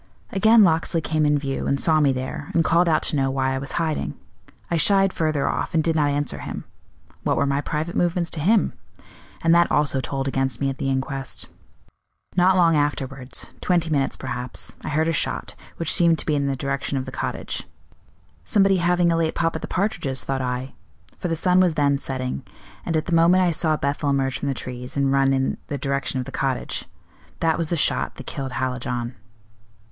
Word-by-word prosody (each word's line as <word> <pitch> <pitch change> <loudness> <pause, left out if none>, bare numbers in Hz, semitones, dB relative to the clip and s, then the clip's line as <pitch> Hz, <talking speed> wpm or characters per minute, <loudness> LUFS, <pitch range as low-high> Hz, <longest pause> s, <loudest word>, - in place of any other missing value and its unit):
Again 220 +1 +6
Locksley 165 -1 +2
came 155 -1 0
in 145 0 +3
view 140 -1 -3
and 140 - +1
saw 160 +1 +3
me 145 -2 +4
there, 130 +2 -4
and 165 - +4
called 170 +1 +3
out 155 - +2
to - - +1
know 135 -1 +1
why 130 0 0
I 135 - -1
was 135 - -6
hiding. 155 - -1 0.6
I - - +2
shied 195 +3 +4
further 155 -3 0
off, - - -2
and 160 - +3
did 165 0 +1
not 150 -2 +2
answer 145 -1 -1
him - - -6 0.6
what - - 0
were 140 - +2
my 140 0 0
private 155 +3 -3
movements 175 -1 0
to 160 - -4
him? 205 +8 +3 0.7
and 165 - +5
that 170 0 +4
also 140 -2 +2
told 135 0 -3
against 135 -3 -1
me 135 -1 0
at 135 - -9
the 135 - -1
inquest. 135 0 -3 0.9
Not 185 +1 +4
long 165 -2 +5
afterwards 135 -3 -2
twenty 170 -3 +1
minutes, 140 -3 0
perhaps 125 -1 -5
I - - -4
heard 155 +2 +1
a 165 - +1
shot, - - -1 0.2
which 165 - +2
seemed 170 -2 +5
to - - -1
be 155 - +1
in 140 -1 +1
the 135 - 0
direction 140 +1 -2
of 130 - -2
the 130 - -7
cottage. - - -4 0.8
'Somebody 195 - +3
having 175 0 +2
a - - +2
late 165 -1 0
pop 165 -1 0
at - - -4
the - - -5
partridges,' 140 - -1
thought 135 +2 -2
I; 125 +1 -3 0.5
for - - -2
the 165 - 0
sun 180 +3 +3
was 180 -4 +3
then 140 -1 +2
setting, 130 - -4 0.5
and 165 - +1
at 155 - -1
the 175 - -2
moment 170 +3 +5
I 175 - +3
saw 155 -1 +1
Bethel 145 +1 -1
emerge 135 -1 0
from 145 - -3
the 135 - -1
trees, 125 +2 -6
and 140 -1 +2
run 135 0 +3
in 135 0 0
the 145 - -3
direction 140 0 -1
of 125 - -3
the - - -8
cottage. 135 -2 -2 0.5
That 160 -1 +2
was 165 -2 -1
the 170 - 0
shot - - +1
that 135 - -10
killed 135 -2 -5
Hallijohn." 125 -1 -2
145 Hz, 210 wpm, -23 LUFS, 135-165 Hz, 0.9 s, Again